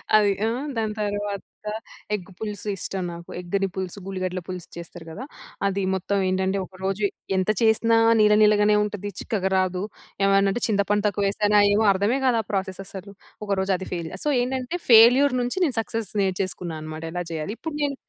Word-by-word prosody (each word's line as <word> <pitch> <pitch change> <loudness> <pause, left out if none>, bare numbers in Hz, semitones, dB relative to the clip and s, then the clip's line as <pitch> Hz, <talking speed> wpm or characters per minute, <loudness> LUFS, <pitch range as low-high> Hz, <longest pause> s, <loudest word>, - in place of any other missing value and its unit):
అది 205 -1 +5
ఆ! - - +2 0.3
దాని 215 -1 -1
తరువాత 205 -1 -2 0.7
ఎగ్ 190 -1 -8
పులుసు 210 -2 -5
ఇష్టం. 190 +1 -4
నాకు 170 0 -10
ఎగ్‌ని 195 +2 -1
పులుసు, 190 +1 -4
ఉల్లిగడ్డల 185 -1 -3
పులుసు 180 -2 -6
చేస్తారు 170 0 -9
గదా! 240 - -7 0.4
అది 195 0 -1
మొత్తం 195 +2 -1
ఏంటంటే, 190 +1 0
ఒకరోజు 190 +2 -4 0.3
ఎంత 185 +2 0
చేసినా 225 +1 +4 0.2
నీళ్ల 210 0 +6
నీళ్లగానే 210 0 +5
ఉంటది. 205 -1 -4
చిక్కగా 190 -4 -1
రాదు. 185 0 0 0.4
ఏమన్నా 195 0 +4
అంటే 240 - -4
చింతపండు 205 -1 +1
తక్కువేశానా 205 +1 +2
ఏమో 215 +1 +3
అర్థమే 205 +8 +1
గాదు, 240 -3 +3
ఆ - - -36
ప్రాసెస్ 190 -1 -2
అసలు. 195 +1 -9 0.3
ఒకరోజు 195 -1 0
అది 190 - -7
ఫెయిల్. 170 -2 -4
సో, - - +2
ఏంటంటే, 260 +6 -2
ఫెయిల్యూర్ 245 +4 +7
నుంచి 245 +9 -2
నేను 265 -7 -2
సక్సెస్ 225 -2 -4
నేర్చేసుకున్నా 185 -3 -2
అన్నమాట. 155 +1 -7
ఎలా 175 0 -2
చేయాలి? 160 +5 -3
ఇప్పుడు 320 -2 -5
నేను 280 -1 0
200 Hz, 165 wpm, -24 LUFS, 185-215 Hz, 0.7 s, ఫెయిల్యూర్